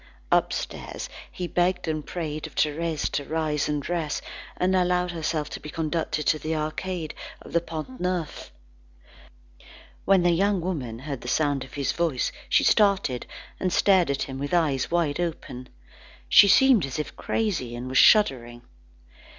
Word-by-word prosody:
Upstairs, - - -1 0.2
he 180 - -5
begged 180 0 0
and 155 -1 -2
prayed 155 -3 -5
of - - -17
Thérèse 155 +1 0
to 145 - -1
rise 155 -2 -1
and 150 0 0
dress, 165 -4 -2 0.4
and 185 +1 +1
allow 180 0 +2
herself 160 -3 -2
to - - -5
be 150 - -9
conducted 155 -1 -2
to 155 - +2
the 155 +2 -2
Arcade 155 +2 -3 0.3
of - - -13
the 170 - +3
Pont 165 +10 -7
Neuf. 180 -3 -3 1.5
When 195 -2 +4
the 175 - +4
young 195 +3 +2
woman 145 -11 -4
heard 135 0 -6
the - - -9
sound 145 0 +1
of 130 - -12
his 140 -2 0
voice, 165 -7 0 0.2
she - - +4
started, 195 - +2 0.3
and 185 - 0
stared 185 -4 +4
at 140 - 0
him 135 -1 -6
with 145 +4 -1
eyes 145 -6 +1
wide 165 -4 0
open. 155 -7 -4 0.6
She 200 - +8
seemed 245 0 +5
as 135 - -5
if 150 - -4
crazy, 170 - -2
and 120 +1 -6
was 130 0 +2
shuddering. 120 - +4
160 Hz, 160 wpm, -25 LUFS, 145-180 Hz, 1.5 s, She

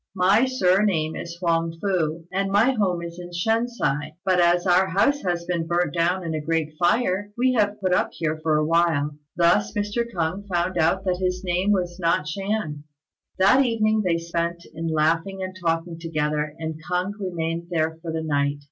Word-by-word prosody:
My 195 +6 +4
surname 185 -8 +2
is 170 0 -7
Huang 165 -2 0
fu, 165 -4 -1
and 195 +1 0
my 215 +6 +4
home 190 -8 0
is 170 +1 -7
in 175 0 -8
Shen 225 +7 +1
si; 155 - -2
but 185 -2 +3
as 175 +1 +3
our 185 +1 +4
house 200 +10 +2
has 175 -2 -2
been 170 -2 -2
burnt 175 +1 0
down 175 +2 +1
in 165 -1 -3
a 155 - -2
great 160 0 -1
fire, 200 +2 +1
we 255 +1 +3
have 210 -3 +1
put 185 -2 +1
up - - +2
here 155 -1 -1
for 155 -1 +1
a 155 - +1
while." 165 -3 +2 0.3
Thus 170 -12 +3
Mr. 205 +3 0
K'ung 185 +2 -2
found 180 0 -1
out 190 +4 +2
that 180 -1 +1
his 185 0 -1
name 180 +2 +1
was 180 -2 -1
not 165 -3 +1
Shan. 180 -4 -3 0.5
That 200 +9 +5
evening 220 -3 +1
they 175 -3 +1
spent 170 0 -3
in 165 +1 -4
laughing 165 +5 0
and 185 0 -6
talking 165 0 -1
together, 150 -2 -2
and 160 -1 -5
K'ung 180 +3 0
remained 170 -3 -3
there 160 -1 -1
for 165 -1 -5
the 160 0 -3
night. 145 -2 0
175 Hz, 190 wpm, -24 LUFS, 165-195 Hz, 0.5 s, That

